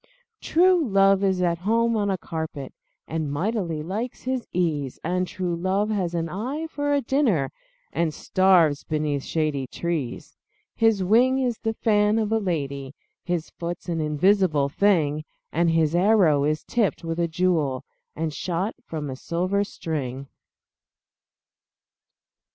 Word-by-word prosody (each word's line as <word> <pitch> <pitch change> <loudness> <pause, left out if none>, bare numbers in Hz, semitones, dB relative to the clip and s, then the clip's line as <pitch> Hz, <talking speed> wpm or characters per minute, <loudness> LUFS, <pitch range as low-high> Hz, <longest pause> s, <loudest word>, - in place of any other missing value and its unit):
True 360 0 +4
love 195 -4 +4
is 190 -2 +2
at 170 -1 +1
home 230 +4 +2
on 205 -2 0
a 190 - 0
carpet, 160 -6 -6 0.3
And 155 -3 -2
mightily 170 -1 -2
likes 215 +9 -4
his 260 -1 -2
ease 155 -7 -1
And 180 +2 0
true 180 -2 -3
love 190 +5 0
has 180 -5 -1
an 165 -1 -1
eye 250 - -4
for 290 -2 -2
a 285 -1 +2
dinner, 230 - +1 0.4
And 170 -2 +1
starves 170 -3 +3
beneath 150 -2 -1
shady 150 -3 -1
trees. 165 -7 -4 0.4
His 225 -4 +2
wing 245 +7 +4
is 250 -4 -1
the 225 -1 -2
fan 210 -1 +2
of 220 -1 0
a 225 - +3
lady, 140 -7 -3 0.3
His 175 -2 -3
foot's 175 +1 -6
an 165 -2 -1
invisible 155 -1 +2
thing, 155 -5 +2 0.3
And 170 +2 +2
his 165 -1 +2
arrow 175 -6 +4
is 155 +1 0
tipped 220 -7 0
with 165 0 -3
a 170 - +2
jewel, 160 -6 0 0.3
And 160 -1 -2
shot 185 +7 -2
from 155 -7 -5
a 130 - -5
silver 185 +8 -1
string. 140 -9 -4
175 Hz, 145 wpm, -24 LUFS, 155-210 Hz, 0.4 s, True